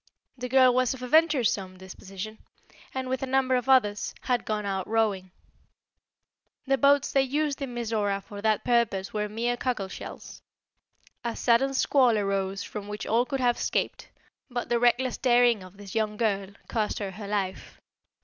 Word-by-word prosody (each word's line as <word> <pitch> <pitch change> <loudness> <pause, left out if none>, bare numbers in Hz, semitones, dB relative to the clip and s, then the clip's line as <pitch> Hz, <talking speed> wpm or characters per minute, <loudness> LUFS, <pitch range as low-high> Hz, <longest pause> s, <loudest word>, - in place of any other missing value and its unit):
The 250 -1 -6
girl 255 -1 +6
was 255 +1 +2
of 255 - -10
a - - -4
venturesome 250 - +2
disposition, 195 +3 -9 0.5
and, 260 -1 -4
with 260 0 -2
a 270 - -2
number 260 0 +2
of 250 +1 -1
others, 210 -6 +3
had 245 -1 0
gone 215 -1 -2
out 190 -2 -2
rowing. 210 -4 0 1.4
The 270 -1 +1
boats 280 0 +4
they 275 - +4
used 285 +2 -1
in 255 -3 -4
Mizora 215 -4 -1
for 205 -2 -9
that 215 0 +1
purpose 230 -6 +1
were 210 -1 -2
mere 235 +3 -1
cockle 240 -7 -2
shells. - - -9 0.8
A 235 -1 -3
sudden 265 +3 +2
squall 255 -4 +3
arose 195 -1 -1
from 205 -1 -7
which 210 0 -5
all 235 +3 +2
could 270 -2 -2
have 245 -1 +2
escaped, - - -2 0.4
but 245 -1 -4
the 235 - +2
reckless 245 +1 +2
daring 240 -4 +4
of 185 +1 -13
this 200 -2 -10
young 215 -1 -1
girl 200 -4 0 0.2
cost 215 -2 -1
her 200 -2 -4
her 205 +2 -8
life. 195 -2 -3
230 Hz, 170 wpm, -27 LUFS, 205-255 Hz, 1.4 s, girl